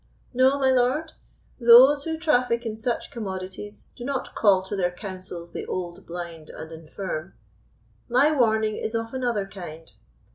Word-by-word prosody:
"No, 260 +2 +4
my 265 -1 +3
lord; 260 +5 +1 0.5
those 260 +4 +8
who 320 -1 -2
traffic 250 -7 +1
in 220 -1 -3
such 235 +2 -3
commodities 190 -1 -6
do 240 - -9
not 270 0 -3
call 195 -4 +4
to 190 +2 -5
their 180 -3 +1
councils 180 -2 -8
the - - -5
old, 175 -2 -5
blind, 170 -2 -7
and 160 +1 -9
infirm. 165 +2 -6 0.7
My 260 +6 +4
warning 220 -6 +2
is 220 - -3
of 225 +1 -3
another 240 -6 -1
kind. 170 -5 -10
220 Hz, 150 wpm, -25 LUFS, 185-255 Hz, 0.7 s, those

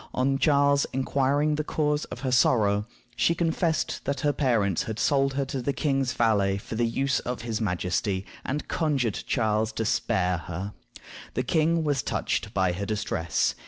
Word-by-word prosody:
On 135 +2 +1
Charles 140 -1 +3
inquiring 140 +3 +1
the 155 +1 -1
cause 150 -1 0
of - - -9
her 130 -2 -1
sorrow, 105 -5 +3 0.3
she 170 - +2
confessed 165 -1 0
that 140 -1 -2
her 145 -1 +2
parents 110 - +1
had 110 - -4
sold 135 0 +2
her 140 0 0
to 135 -1 -4
the 140 +3 -1
king's 135 -4 0
valet 100 -4 +2
for 100 - -8
the 115 +1 +1
use 135 +3 0
of 125 -1 -5
his 115 -2 -3
majesty, 95 0 -1 0.2
and 145 +3 -3
conjured 140 - 0
Charles 110 -1 +1
to 110 - -2
spare 90 -4 +1
her. 90 +5 -6 0.6
The 125 - 0
king 160 +4 +2
was 145 -4 +1
touched 105 - -2
by 95 -4 +1
her 95 +3 -3
distress. 100 -5 0
125 Hz, 170 wpm, -26 LUFS, 105-140 Hz, 0.6 s, Charles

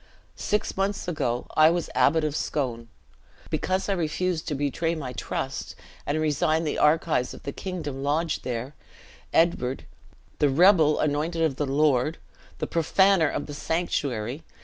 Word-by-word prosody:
Six 210 - -1
months 195 0 -1
ago 125 -8 -1
I 155 0 +7
was 170 0 -1
Abbot 160 +2 +3
of 150 -1 -1
Scone. 120 -8 -2 0.6
Because 185 +1 -1
I 200 - +1
refused 175 0 -1
to 150 - -1
betray 145 +4 -1
my 135 -5 -5
trust, 115 - -4 0.3
and 150 +2 0
resign 155 +1 +1
the 150 - -2
archives 150 -4 +2
of - - -13
the 140 - -4
kingdom 155 -6 -5
lodged 150 +3 0
there, 125 +3 -4 0.6
Edward, 135 -6 +1 0.5
the 145 - +4
rebel 160 0 +5
anointed 155 +3 0
of 145 -5 0
the 145 - -1
Lord! 145 +1 +2 0.4
the - - -2
profaner 170 +1 +3
of - - -3
the 145 - -8
sanctuary! 140 -6 -2
155 Hz, 150 wpm, -26 LUFS, 140-170 Hz, 0.6 s, I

